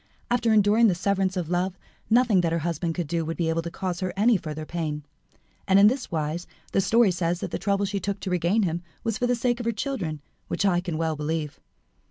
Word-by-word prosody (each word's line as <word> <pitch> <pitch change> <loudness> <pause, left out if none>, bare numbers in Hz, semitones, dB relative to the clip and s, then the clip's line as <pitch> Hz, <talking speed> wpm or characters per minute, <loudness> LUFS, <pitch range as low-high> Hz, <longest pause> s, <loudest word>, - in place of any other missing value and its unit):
After 235 -2 +2
enduring 215 +2 +5
the 185 - +2
severance 195 0 0
of 175 -3 -2
love, 180 +2 -1 0.3
nothing 230 -5 +4
that 170 -2 0
her 165 - +1
husband 165 0 -1
could 175 - -2
do 165 +2 -1
would 165 +1 -4
be 165 -2 0
able 165 +1 0
to 170 - -5
cause 180 0 -4
her 185 -1 -2
any 225 +3 +4
further 155 -4 -4
pain. 155 -3 -3 0.6
And 190 - +5
in 200 - +7
this 260 +1 -3
wise 160 +1 -2 0.2
the 195 - +2
story 225 +1 +4
says 175 0 -1
that - - -4
the - - -3
trouble 200 0 +1
she 200 0 -2
took 200 +1 -3
to 190 - -3
regain 180 +5 +2
him 170 -1 -1 0.2
was 225 -1 -1
for 245 - +1
the 245 - +2
sake 240 +1 0
of 240 - -4
her - - +3
children 210 - -3 0.3
which 200 - -1
I 180 -3 +3
can 175 -3 -3
well 160 -1 0
believe." 150 0 -3
185 Hz, 240 wpm, -26 LUFS, 165-210 Hz, 0.6 s, in